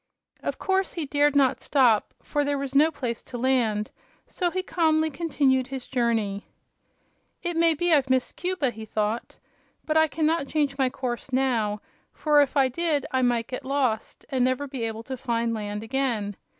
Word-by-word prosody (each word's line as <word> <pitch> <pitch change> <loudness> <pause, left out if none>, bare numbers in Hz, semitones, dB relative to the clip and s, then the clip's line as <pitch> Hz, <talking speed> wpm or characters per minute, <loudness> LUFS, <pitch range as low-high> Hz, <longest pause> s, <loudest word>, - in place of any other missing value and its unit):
Of - - -3
course 380 0 0
he 330 -4 -3
dared 290 +1 +2
no 270 -3 +5
stop, 245 -7 +3
for 290 - 0
there 285 0 0
was 275 -1 -4
no 300 +3 +5
place 245 -7 -4
to 245 - -8
land; 230 -5 +1 0.3
so 355 -2 -1
he 370 +2 -2
calmly 315 -3 +2
continued 270 -4 +1
his 270 -2 -6
journey. 225 -5 -1 1.0
"It 345 -1 -2
may 330 -1 +4
be 345 +2 +1
I've 275 -3 +3
missed 260 -1 +1
Cuba," 360 -8 -1
he 220 -1 -9
thought; 215 +1 -2 0.5
"but 310 0 +1
I 315 0 +5
can 310 +1 -1
not 315 -2 +1
change 290 -2 0
my 265 -2 +2
course 250 0 -5
now, 235 -6 +1 0.3
for 300 -1 +4
if 285 +1 0
I 270 -1 +5
did 300 +1 -1
I 260 - +1
might 240 -2 +2
get 255 - -6
lost, 260 -5 -1
and 260 -3 +1
never 255 +2 +1
be 260 -4 -4
able 225 0 -5
to 260 - -5
find 235 -2 -1
land 210 -1 -4
again. 225 -5 -1
265 Hz, 185 wpm, -26 LUFS, 235-300 Hz, 1.0 s, no